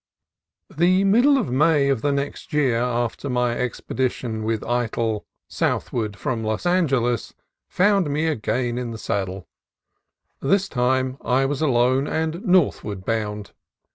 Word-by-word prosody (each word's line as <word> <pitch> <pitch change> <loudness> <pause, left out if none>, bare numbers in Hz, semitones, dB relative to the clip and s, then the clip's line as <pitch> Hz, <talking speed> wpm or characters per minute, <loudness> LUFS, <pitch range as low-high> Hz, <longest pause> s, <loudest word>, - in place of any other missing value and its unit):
The 180 +4 +3
middle 240 +9 +5
of 235 - -1
May 145 +1 +3
of 135 -5 +1
the 145 - +1
next 140 +4 -4
year 135 -6 +2
after 120 +2 -2
my 125 -1 +1
expedition 125 -2 -2
with 110 0 -1
Eytel 115 -2 -1 0.2
southward 105 -4 -2
from 115 +3 -2
Los 110 +7 -2
Angeles 135 -10 +1 0.3
found 195 -3 +2
me 150 +3 0
again 125 -4 -1
in 125 -1 -4
the 115 - -6
saddle. 95 -5 -3 0.9
This 195 +8 +1
time 130 -1 0
I 130 +3 +2
was 140 +1 -2
alone, 130 -1 +2
and 160 +3 -2
northward 140 - +1
bound. 105 -2 -3
130 Hz, 135 wpm, -23 LUFS, 115-155 Hz, 0.9 s, middle